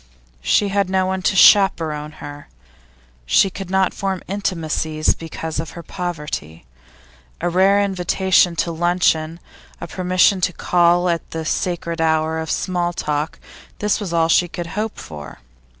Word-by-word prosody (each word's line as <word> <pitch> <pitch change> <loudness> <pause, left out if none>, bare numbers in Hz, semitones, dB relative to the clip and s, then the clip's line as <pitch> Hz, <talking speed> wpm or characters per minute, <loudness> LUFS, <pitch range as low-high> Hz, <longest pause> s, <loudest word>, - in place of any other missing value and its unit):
She 200 - +2
had 200 -1 0
no 190 0 +1
one 190 0 -2
to 190 - +1
chaperon 160 -7 +4
her; 145 -1 -10 0.8
she 185 - +4
could 190 0 -7
not 190 0 +1
form 195 -2 -3
intimacies 160 -5 -1
because 160 -1 -6
of 160 +1 -6
her 170 - -7
poverty. 150 - -5 0.7
A - - -1
rare 190 +3 +4
invitation 190 -2 +2
to 170 - -1
luncheon, 165 -1 +1 0.4
a - - -5
permission 185 +1 +2
to 180 0 +1
call 175 +1 +2
at 170 -1 -1
the 160 -1 -5
sacred 170 0 -2
hour 160 0 +1
of 160 -1 -5
small 175 0 -1
talk 150 -1 -2 0.4
this 210 +1 0
was 200 -5 -5
all 165 -1 +2
she 175 +2 +3
could 170 0 -6
hope 215 +2 -3
for. 75 -2 -9
175 Hz, 150 wpm, -20 LUFS, 160-190 Hz, 0.8 s, chaperon